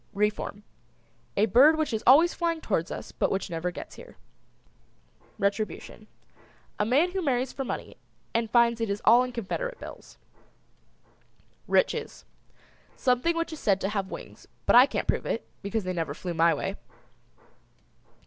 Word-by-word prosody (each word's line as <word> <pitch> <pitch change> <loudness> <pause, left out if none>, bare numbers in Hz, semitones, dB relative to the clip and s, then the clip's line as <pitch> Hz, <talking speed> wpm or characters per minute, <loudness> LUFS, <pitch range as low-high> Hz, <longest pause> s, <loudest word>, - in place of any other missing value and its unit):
REFORM. 210 0 -1 0.7
A 205 - +5
bird 270 +9 +6
which 310 -6 -1
is 220 - -2
always 315 +7 +7
flying 335 -2 -1
towards 185 - -1
us - - -7
but - - 0
which 195 -1 -3
never 165 +2 -2
gets 175 - -9
here. - - -13 1.2
RETRIBUTION. 205 +1 -3 0.7
A 210 - +2
man 290 +10 +3
who 380 +1 -2
marries 260 -5 0
for 270 - -4
money - - -6 0.4
and 230 -1 0
finds 235 0 +3
it 225 - -1
is 200 +1 -2
all 235 +3 +7
in 250 0 -2
Confederate 470 - -4
bills. - - -11 1.5
RICHES. - - 0 0.7
Something 260 +7 +1
which 335 -1 -2
is 310 - -8
said 195 -2 +2
to 195 - -1
have 195 -2 -2
wings, - - -10 0.2
but - - +4
I 250 +3 +9
can't - - -3
prove - - 0
it, - - -3
because 205 +1 -2
they 185 0 -3
never 160 -5 -3
flew 175 +1 -5
my 165 0 +4
way. - - -4
230 Hz, 160 wpm, -27 LUFS, 200-280 Hz, 1.5 s, I